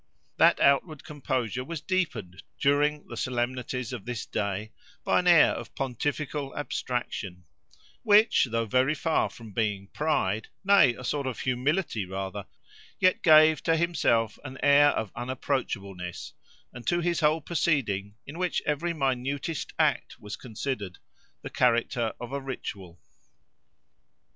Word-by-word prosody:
That - - +5
outward 145 +2 +2
composure 125 -5 -3
was 165 +4 -5
deepened 125 - -2 0.2
during 145 +1 +2
the - - -8
solemnities 125 0 -3
of 120 -6 -6
this 120 -3 -4
day 100 +1 -3 0.3
by - - +3
an 180 - -1
air 170 -3 +7
of - - -7
pontifical 140 +2 -3
abstraction; 120 -10 -4 0.6
which, 215 -4 +5
though 115 0 0
very 130 +7 +2
far 160 +1 +1
from 115 -2 -12
being 100 -2 -1
pride—nay, 150 - +2
a 130 - -10
sort 140 +1 -2
of 130 - -4
humility 130 - -1
rather—yet 95 - -3
gave, 155 -1 +6
to 165 -1 +2
himself, 115 -10 +1
an 130 -2 -8
air 145 0 +6
of 110 -7 -3
unapproachableness, 100 -8 -4 0.4
and 120 -1 -10
to 175 0 +2
his 170 0 0
whole 155 0 +3
proceeding, 130 - -1
in 155 +5 -9
which 180 -2 -1
every 165 +4 -1
minutest 140 +2 -2
act - - 0
was 105 0 -7
considered, 110 -5 -5 0.5
the - - -7
character 120 -1 +1
of 120 +1 -7
a 140 - -2
ritual. 95 -9 -7
130 Hz, 130 wpm, -27 LUFS, 110-150 Hz, 0.6 s, air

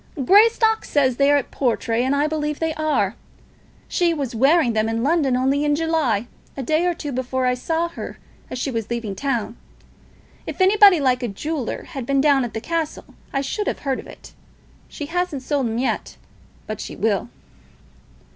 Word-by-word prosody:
"Greystock 445 - +5
says 260 -4 +1
they 280 0 +4
are 290 - +5
at 280 - -3
Portray, 235 -2 0
and 265 +2 +1
I 285 +1 +2
believe 300 -1 -2
they 320 -1 -1
are. 295 -11 0 0.7
She 345 -2 +1
was 275 -5 -3
wearing 270 +2 +3
them 220 0 +1
in 225 +1 -1
London 285 -4 +2
only 270 +3 +1
in 295 0 +2
July, 300 -9 0 0.3
a 270 - -3
day 315 +7 +1
or 350 - 0
two 295 -3 -5
before 260 0 -2
I 250 - +3
saw 325 +7 -1
her 340 - -8 0.3
as - - -5
she 265 +2 -2
was 225 -3 -3
leaving 230 -4 -3
town. 240 -2 -2 0.9
If - - -6
anybody 390 -1 +6
like 255 -2 +2
a 245 - -1
jeweller 270 +5 -4
had 270 -8 -7
been 275 0 +2
down 280 -2 +4
at 235 -2 -5
the - - -1
castle, 330 +1 -4 0.2
I 275 - 0
should 415 +9 -3
have - - -2
heard 270 -2 -1
of - - -10
it. - - -13 0.6
She 295 - -6
hasn't 330 -4 -2
sold 280 -2 0
'em 225 0 -2
yet, 255 +2 -2 0.5
but 215 -1 -5
she - - -7
will." 215 +2 0
275 Hz, 190 wpm, -22 LUFS, 245-320 Hz, 0.9 s, anybody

